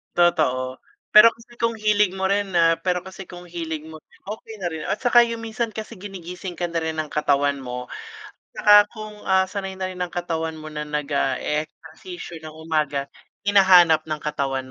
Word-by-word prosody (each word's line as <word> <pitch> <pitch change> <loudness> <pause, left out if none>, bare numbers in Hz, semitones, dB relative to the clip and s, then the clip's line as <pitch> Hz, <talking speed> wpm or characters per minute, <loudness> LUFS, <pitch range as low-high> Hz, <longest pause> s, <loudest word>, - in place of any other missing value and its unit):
Totoo. 130 -7 +2 0.4
Pero 215 +2 +10
kasi 235 +1 -19
kung 230 0 +2
hilig 210 -2 +2
mo 190 - -1
rin 200 -1 0
na 165 -1 +4
pero 180 +1 -1
kasi 190 0 -9
kung 175 0 -10
hilig 160 -3 -5
mo 160 0 -10
rin, - - -26
okey 220 +1 -7
na 180 - -1
rin 160 -2 -6
at - - -1
saka 245 -1 +5
yung 230 -1 -5
minsan 225 +1 -2
kasi 215 0 -7
ginigising 180 -2 -8
ka 175 - -1
na 165 -1 -2
rin 160 0 -3
ng 155 -1 -3
katawan 145 -1 +1
mo, 125 -1 -5 0.7
tsaka 205 0 +7
kung, 215 -1 -8
ah, 190 0 +3
sanay 195 -1 -5
na 190 0 -3
rin 185 - -9
ng 180 - -3
katawan 165 -2 -3
mo 155 - -9
na 150 0 -4
nag-eehersisyo 150 +4 -3
nang 155 -1 -9
umaga, 155 -3 -1 0.4
hinahanap 180 -6 +6
ng 155 -1 -3
katawan 135 -3 -2
170 Hz, 185 wpm, -23 LUFS, 155-195 Hz, 0.7 s, Pero